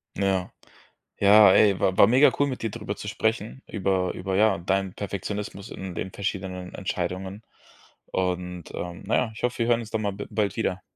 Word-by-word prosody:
Ja. 95 -2 0 0.7
Ja, 100 0 +8
ey, 100 -2 +5
wa 95 - +1
war 100 - +8
mega 130 +5 +6
cool, 145 - +3
mit 130 -3 -5
dir 115 - -1
drüber 105 -3 -5
zu 105 - -8
sprechen, 110 +3 -2
über 95 -3 0
über, 95 0 -3
ja, 105 -1 +4
deinen 95 +1 -1
Perfektionismus 100 0 -5
in 95 -2 -7
den 95 - -4
verschiedenen 95 -2 -4
Entscheidungen. 95 +2 -4 0.7
Und, 90 -1 -2
ähm, 90 -1 -6
na - - +1
ja, 115 - +1
ich - - -10
hoffe, 125 0 -1
wir 115 - +1
hören 120 -1 +3
uns 110 - -9
da 110 - 0
mal 100 -2 -1
b 100 +1 -6
bald 100 -3 -1
wieder. 95 -4 -1
100 Hz, 190 wpm, -25 LUFS, 95-110 Hz, 0.7 s, Ja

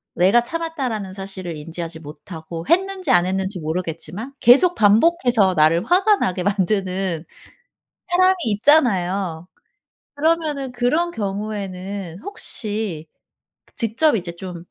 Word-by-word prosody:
내가 195 +7 +4
"참았다."라는 255 - -4
사실을 190 -3 -6
인지하지 165 +2 -7
못하고 165 +2 -9
했는지 370 -3 +1
안 175 -7 +5
했는지 190 +1 -2
모르겠지만 170 - -4
계속 280 +10 +5
반복해서 225 - +3
나를 160 +3 +3
화가 395 +4 +3
나게 180 - -2
만드는 190 -3 -1 0.9
사람이 370 +1 +4
있잖아요? 195 - +2 0.7
그러면은 300 -3 0
그런 275 +8 0
경우에는 195 - -5
혹시 210 - 0 0.7
직접 230 +6 +2
이제 175 -5 -4
좀 175 -1 -8
200 Hz, 275 characters per minute, -21 LUFS, 180-270 Hz, 0.9 s, 안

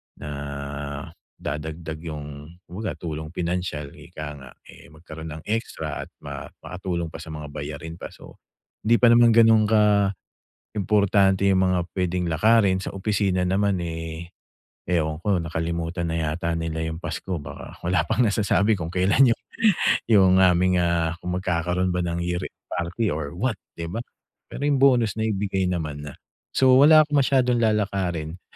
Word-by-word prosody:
na 75 - -8 1.1
dadagdag 80 +1 -5
yung 75 -1 -7 0.2
kumbaga 105 +5 -5
tulong 80 -2 -5
pinansiyal 85 -5 -3
ika 75 0 -9
nga, 70 -2 -12 0.2
eh, - - -14
magkaroon 80 0 -10
ng 80 - -10
extra 115 +1 -3
at - - -24
ma - - -7 0.2
makatulong 85 -3 -4
pa - - -8
sa - - -10
mga 75 -1 -7
bayarin 75 +3 -7
pa. - - -6
So, - - -15 0.5
hindi 115 +2 +5
pa 120 -1 +7
naman 115 -1 +6
gano'n 110 -2 +6 0.9
kaimportante 100 -1 +1
yung 95 -1 +3
mga 90 -1 +2
pwedeng 90 -1 -1
lakarin. 100 +2 +4
Sa - - -6
opisina 95 -2 0
naman, 100 +2 +1
eh, 80 0 -6 0.6
ewan 80 -3 0
ko 90 -2 0
nakalimutan 85 +1 -3
na 80 - -2 0.2
yata 85 0 -2
nila 80 0 -3
yung 80 +2 -6
pasko 85 +3 -4
baka 70 - -9
wala 85 -1 +1
pang 125 - +2
nasasabi 105 -1 +2
kung 80 - -3
kailan 100 +7 +4
yung, - - -39 0.7
yung 95 -4 +6
aming, 90 0 +4
ah, 85 -1 +1
kung 90 0 -2
magkakaroon 90 0 0
ba 90 - 0
ng 85 -1 -2
year 90 0 -2 0.3
party 90 +4 -1
or 75 +1 -5
what 125 +4 0 0.2
'di 85 - -4
ba. 115 - -2 0.5
Pero 145 - -4
yung 140 -2 +2
bonus 120 -6 +4
naibigay 100 -4 0
naman 75 -5 -3
na. 75 - -9 0.4
So, 130 -1 +5
wala 155 +1 +8
akong 145 -2 +2
masyadong 125 -3 +2
lalakarin. 95 -6 -1
90 Hz, 155 wpm, -24 LUFS, 80-105 Hz, 1.1 s, wala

